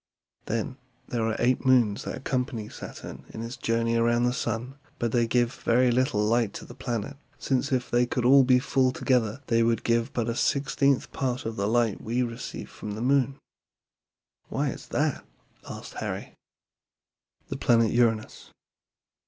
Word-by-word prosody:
Then, 115 +3 -2 0.3
there 120 - -1
are 110 - 0
eight 125 +1 +2
moons 120 -6 +3
that - - -3
accompany 125 -4 -2
Saturn - - -9
in 110 - -6
its 115 +2 -5
journey 115 0 0
around 120 +1 +3
the 125 0 +2
sun; 125 +3 -3 0.2
but 120 -1 -1
they 120 -1 +2
give 120 +1 +2
very 125 +1 +2
little 120 -4 +2
light 115 -1 +2
to - - -8
the - - -11
planet, 130 +1 -4 0.2
since 135 +1 -1
if 125 -2 -1
they 120 0 +3
could 120 0 -1
all 135 +2 +7
be 125 0 +5
full 130 0 +2
together 125 0 0
they 115 -1 +2
would 115 -1 +2
give 115 +2 +1
but 120 -2 -1
a 115 - 0
sixteenth 140 0 +1
part 130 -2 -2
of 115 0 -3
the 100 -1 -1
light 115 -2 +1
we 120 +3 0
receive 115 -1 -6
from 105 - -6
the 110 - -5
moon." 135 +1 +2 1.1
"Why - - 0
is - - -8
that?" - - 0 0.5
asked - - -8
Harry. - - -5 1.2
THE - - -3
PLANET 115 -2 +3
URANUS. 115 -2 0
120 Hz, 170 wpm, -27 LUFS, 115-130 Hz, 1.2 s, all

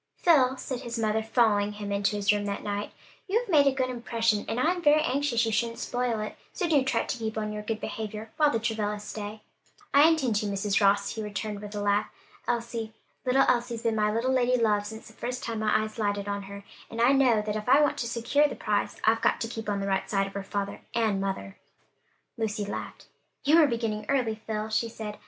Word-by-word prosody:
"Phil," 265 -6 +4
said 255 -2 -4
his 235 0 -5
mother, 220 -1 +1
following 215 -3 +2
him 205 -1 -6
into 200 +1 +1
his 205 0 +3
room 205 0 -1
that 200 0 -3
night, 205 0 -3 0.4
"you 400 +3 +2
have - - -7
made 295 -7 +5
a - - +5
good 260 -1 -1
impression, 230 -3 0
and 235 - -2
I'm 350 +6 +1
very 305 -1 +5
anxious 265 -5 +1
you 225 - -1
shouldn't 230 +2 0
spoil 245 -2 -1
it; 215 - -5 0.2
so 360 - -1
do 295 -5 +3
try 265 - +1
to - - -3
keep 220 -1 -3
on 215 -1 -2
your 210 - -4
good 215 +1 -3
behavior 215 0 -5
while 300 -1 +5
the 230 - +1
Travillas 210 -2 -2
stay." 210 0 -6 0.5
"I 285 +3 +8
intend 265 -10 +1
to, 210 - -1
Mrs. 200 +1 0
Ross," 200 0 +3
he 225 - -4
returned, 210 0 -4
with 210 0 -8
a 205 - -2
laugh. 205 +1 +1 0.4
Elsie, 235 -2 -2 0.3
little 270 +2 +4
Elsie's 240 -2 0
been 230 -1 +1
my 210 -1 +2
little 235 +4 0
lady 250 -1 +2
love 210 -2 +2
since 220 +1 -9
the 220 - -14
first 250 +2 -5
time 230 -2 -3
my 215 0 +2
eyes 215 +1 -7
lighted 205 -1 -1
on 200 0 -2
her, 200 0 -8 0.3
and 230 - -7
I 240 +3 +5
know 260 -5 +4
that 210 0 -3
if 215 +2 -3
I 275 +3 +7
want 295 - +2
to 235 - -1
secure 235 +6 +2
the 285 - -6
prize, 210 -1 -1
I've 225 +1 +3
got - - +2
to 230 - -1
keep 225 -2 -5
on 200 -1 -1
the 195 - -2
right 195 -1 -1
side 195 -1 +1
of 195 - -8
her 200 - -3
father 200 0 -4
and 215 -4 +1
mother." 145 - -4 0.8
Lucy 210 -2 -1
laughed. 200 - -6 0.4
"You 310 +4 +6
are 305 - +6
beginning 225 -4 -2
early, 255 -5 +1
Phil," 215 0 -2
she 220 +1 0
said. 215 -2 -7
220 Hz, 235 wpm, -27 LUFS, 210-245 Hz, 0.8 s, I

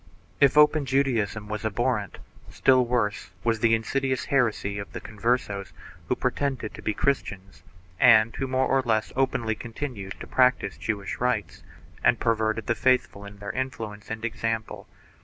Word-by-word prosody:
If 140 +1 +4
open 150 -1 +5
Judaism 120 -6 0
thus 105 - -10
was 105 +1 -4
abhorrent, 110 -1 -1 0.3
still 130 -1 +4
worse 115 -4 -1
was 115 -1 +1
the 115 0 +4
insidious 130 +4 -1
heresy 110 -6 0
of 100 - -8
the - - -4
Converses 105 -2 -2 0.3
who - - +1
pretended 135 -6 -2
to - - -10
be 105 - -2
Christians 100 -8 -2 0.4
and 115 -2 +6
who 135 - -2
more 130 0 +1
or 135 - +2
less 110 -4 0
openly 125 -4 0
continued 115 -4 -6
to - - -7
practise 125 -6 +2
Jewish 100 -3 -3
rites 125 -4 -1 0.4
and - - +4
per 115 0 +2
verted 110 0 -1
the 115 - +1
faithful 125 -4 +1
by 100 - -8
their 100 0 -7
influence 110 -5 -5
and 110 +1 -4
example. 115 -1 -3
115 Hz, 160 wpm, -26 LUFS, 105-130 Hz, 0.4 s, and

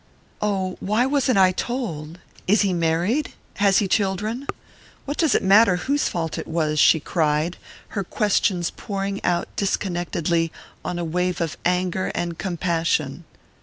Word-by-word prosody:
"Oh, 190 -3 -1
why 215 +5 +1
wasn't 265 -4 +2
I 185 -1 +6
told? 180 - -4 0.3
Is 205 +3 +4
he 195 -3 +2
married? 175 - 0 0.2
Has 200 -2 +4
he 200 - +2
children? 210 +7 -1 0.6
What 285 +2 -4
does 320 -6 +3
it - - +2
matter 195 0 +6
whose 280 +11 0
fault 165 -2 -3
it - - -6
was?" 155 -2 0
she 160 - +6
cried, 155 +1 0 0.3
her 200 - -2
questions 190 -3 +1
pouring 200 -2 -4
out 175 -1 +1
disconnectedly 175 -4 -1 0.3
on 180 - -3
a 175 - -2
wave 180 +2 -1
of 165 -3 -2
anger 180 +1 +1
and 170 -1 -3
compassion. 165 -4 -1
185 Hz, 145 wpm, -23 LUFS, 170-205 Hz, 0.6 s, I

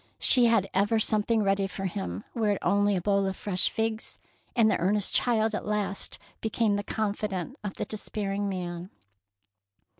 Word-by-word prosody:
She 250 -3 +5
had 225 -4 +3
ever 205 +4 +2
something 215 0 +2
ready 195 0 +1
for 195 +1 -5
him, 95 - -4
were 220 -3 +1
it 205 - +2
only 205 +2 +3
a 180 - -1
bowl 200 +1 +2
of 190 - -2
fresh 185 -2 0
figs; 220 0 -2 0.4
and 230 -3 +5
the - - +2
earnest 195 +3 +1
child 225 -2 +2
at 210 - -3
last 205 -2 -1 0.2
became 220 -1 +1
the 205 - 0
confidant 205 +1 -3
of 205 -2 -4
the - - -3
despairing 205 -1 -3
man. 175 -1 -5
205 Hz, 170 wpm, -28 LUFS, 195-220 Hz, 0.4 s, She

